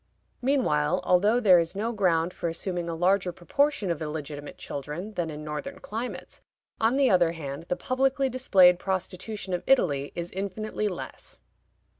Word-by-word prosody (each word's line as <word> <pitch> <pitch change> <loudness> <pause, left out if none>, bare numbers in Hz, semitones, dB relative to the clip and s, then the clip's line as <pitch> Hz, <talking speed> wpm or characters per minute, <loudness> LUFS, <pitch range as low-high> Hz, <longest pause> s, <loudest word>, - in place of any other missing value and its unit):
Meanwhile, 180 - +1
although 205 +7 +3
there 190 -7 +6
is 170 +2 -2
no 220 +4 -1
ground 180 -4 +1
for 170 - -3
assuming 175 +1 -3
a 165 - -3
larger 185 +2 +2
proportion 250 - 0
of 165 - -3
illegitimate 150 -1 -6
children 150 +9 -6
than 175 -4 -2
in 150 0 -7
northern 150 -1 -5
climates, 230 +4 -6 0.4
on 225 +3 +3
the 275 -2 +4
other 175 -3 +4
hand, 145 -1 -6
the - - +1
publicly 265 +3 +1
displayed 190 -9 +5
prostitution 190 +1 -3
of 180 - -1
Italy 145 - +2
is 170 0 -4
infinitely 200 +3 -3
less. 185 -4 -7
180 Hz, 155 wpm, -27 LUFS, 165-215 Hz, 0.4 s, there